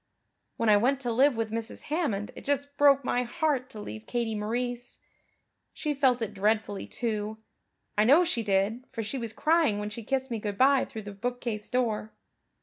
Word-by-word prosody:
When 230 - 0
I 210 -1 +7
went 260 +6 +2
to 245 -3 -1
live 260 +2 +4
with 225 -1 -2
Mrs. 225 0 -2
Hammond 285 - -1
it - - -9
just 285 0 -1
broke 280 -2 +5
my 245 - +1
heart 265 0 -1
to 220 - -8
leave 110 - -8
Katie 235 -2 -1
Maurice. 245 +3 -3 0.8
She 300 -4 -1
felt 260 -4 +2
it 215 -1 -4
dreadfully, 210 0 0
too, 220 -2 -3 0.6
I 210 - +4
know 285 +10 +6
she 330 -9 0
did, 205 +3 +1
for 230 -4 -4
she 260 +6 -4
was 230 -2 -4
crying 310 -4 +2
when 210 0 -4
she 230 - -6
kissed 265 +2 -1
me 230 - -1
good 205 -1 -4
bye 270 +2 +5
through 220 - -8
the 205 - -7
bookcase 235 0 -4
door. 225 -4 -1
235 Hz, 190 wpm, -28 LUFS, 210-265 Hz, 0.8 s, I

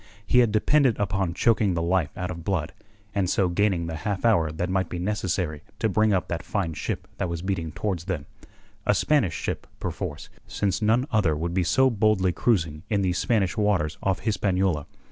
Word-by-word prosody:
He 125 +5 +4
had 120 -3 +4
depended 125 +3 +3
upon 95 -3 -1
choking 105 -3 +2
the 85 - 0
life 85 -3 0
out 90 -1 -3
of 85 -2 -7
Blood, 85 -4 -1 0.4
and 100 -3 0
so 95 -1 +2
gaining 90 -2 +1
the 80 -1 -4
half 100 +4 -3
hour 85 -9 +3
that 85 +3 -2
might 95 -1 0
be 90 - -4
necessary 90 -5 -2 0.2
to 110 - +1
bring 110 +1 +2
up 95 -3 +1
that 85 -1 -3
fine 90 -5 -2
ship - - -4
that 90 - -1
was 85 0 -4
beating 90 -5 -2
towards 90 -1 -3
them 90 -8 -3 0.6
a - - +4
Spanish 140 - +2
ship, - - -4
perforce, - - -5 0.2
since 100 -1 -1
none 115 +4 +3
other 95 -9 +2
would 85 +2 -2
be 95 - +2
so 130 +9 +3
boldly 105 -4 +2
cruising 85 -8 0
in 100 -2 +1
these 90 -1 0
Spanish 105 -5 +1
waters 100 -8 +1
off 95 -1 0
Hispaniola. 95 -6 0
95 Hz, 195 wpm, -25 LUFS, 85-105 Hz, 0.6 s, He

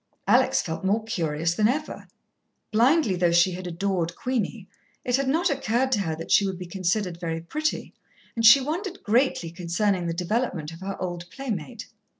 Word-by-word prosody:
Alex - - +4
felt 160 +2 -5
more 205 +4 +1
curious 165 -7 -1
than 210 +4 +3
ever. 300 +6 -3 0.6
Blindly 235 - +3
though 175 -1 +2
she 175 +2 +4
had 180 0 -6
adored 175 -1 -2
Queenie, 230 -5 -3 0.4
it 245 - +2
had 275 0 0
not 325 +5 +2
occurred 260 -1 0
to 225 - +2
her 165 -5 -2
that 165 - -8
she - - +6
would 190 -2 -2
be 180 - -7
considered 180 0 -2
very 165 -2 -3
pretty, 305 - -3 0.4
and 230 - -1
she 235 +5 +9
wondered 350 +8 -4
greatly 225 -7 +1
concerning 180 +1 -1
the 165 - -1
development 180 -3 -2
of 165 +2 -11
her 195 0 -5
old 175 -1 -5
playmate. 210 - -5
195 Hz, 175 wpm, -25 LUFS, 170-245 Hz, 0.6 s, she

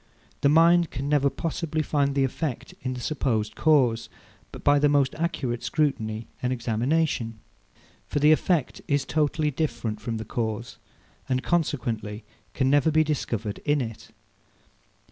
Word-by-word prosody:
The 140 - +4
mind 170 +2 +5
can 135 +3 -4
never 145 -1 +3
possibly 160 0 -2
find 140 -2 0
the 135 - +3
effect 135 0 -3
in 130 -1 -3
the - - -6
supposed 115 -5 -1
cause, 130 -8 +3 0.5
by 145 0 +5
the 145 0 +4
most 140 -2 +3
accurate 135 -8 -2
scrutiny 115 -8 -1 0.2
and 125 - 0
examination. 120 0 0 0.7
For - - -3
the 150 +1 +5
effect 155 -2 +1
is 140 -1 +1
totally 150 +1 +1
different 120 -7 -2
from 115 +1 -3
the 110 - -5
cause, 115 0 -3 0.5
and 130 0 0
consequently 115 - -1 0.3
can 130 - +1
never 145 +2 +4
be 155 0 +4
discovered 115 -8 -2
in 145 0 +1
it. 115 -4 -5
140 Hz, 145 wpm, -26 LUFS, 115-150 Hz, 0.7 s, mind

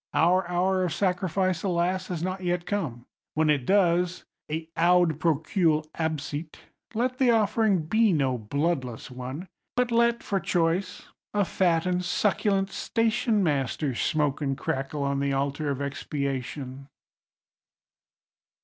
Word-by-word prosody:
Our 180 +2 +3
hour 185 +1 +1
of 175 -4 -1
sacrifice, 185 -1 0
alas, 180 0 0
has 170 -3 -3
not 185 +1 -3
yet 175 -1 -1
come. 140 - -3 0.3
When 155 0 +3
it 140 -4 0
does—(et 175 -4 0
haud 170 -2 +3
procul 160 0 +1
absit!)—let 160 - -4
the 260 -2 +4
offering 215 -4 +3
be 220 +6 +3
no 135 -6 +1
bloodless 130 +1 -2
one, 130 +8 -6 0.3
but 245 -1 +1
let 235 0 +3
(for 195 - 0
choice) 180 +1 0 0.3
a 205 -1 +3
fat 170 -3 +1
and 180 0 0
succulent 195 0 +1
stationmaster 195 - 0
smoke 145 +2 0
and 135 -2 -1
crackle 135 +2 -2
on 140 0 0
the 140 0 0
altar 140 +2 -1
of 140 -1 -2
expiation! 140 -1 -4
170 Hz, 120 wpm, -27 LUFS, 145-190 Hz, 0.3 s, the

